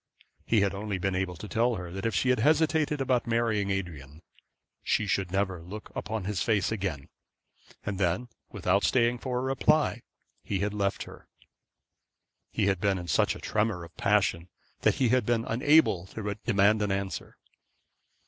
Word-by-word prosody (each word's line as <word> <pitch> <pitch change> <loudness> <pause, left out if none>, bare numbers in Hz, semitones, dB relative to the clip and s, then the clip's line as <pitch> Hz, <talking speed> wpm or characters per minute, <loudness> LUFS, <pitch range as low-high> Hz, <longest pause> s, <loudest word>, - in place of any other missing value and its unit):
He 110 -3 +3
had 100 -1 +1
only 100 0 -3
been 95 +1 -1
able 90 -1 -2
to 105 - -8
tell 115 +3 +1
her 90 -3 -6
that 95 +4 -3
if 115 - -2
she 130 - +2
hesitated 150 +4 +2
about 125 -3 +1
marrying 115 -3 +1
Adrian 80 -7 -4 0.6
she 110 - +1
should 95 -2 -1
never 95 -3 -1
look 100 +6 -9
upon 110 -2 -3
his 100 -2 -2
face 110 -3 +1
again; 95 -10 -3 0.8
and 100 -2 -3
then 95 +6 0 0.2
without 95 +2 +1
staying 120 -1 +2
for 125 -1 -3
a - - 0
reply 135 0 +2 0.4
he 100 - -2
had 100 +2 -1
left 100 -2 -1
her. - - -13 1.2
He 105 - 0
had 95 -3 +1
been 100 -2 +2
in 90 -1 -6
such - - +2
a - - -9
tremor 105 -5 -1
of 85 0 -13
passion 100 -4 +1 0.3
that - - +2
he 130 -3 +2
had 125 0 +3
been 115 +1 0
unable 130 - +3
to 105 0 -4
demand 105 -1 +3
an 105 -1 0
answer. 95 0 -4
105 Hz, 170 wpm, -28 LUFS, 95-115 Hz, 1.2 s, He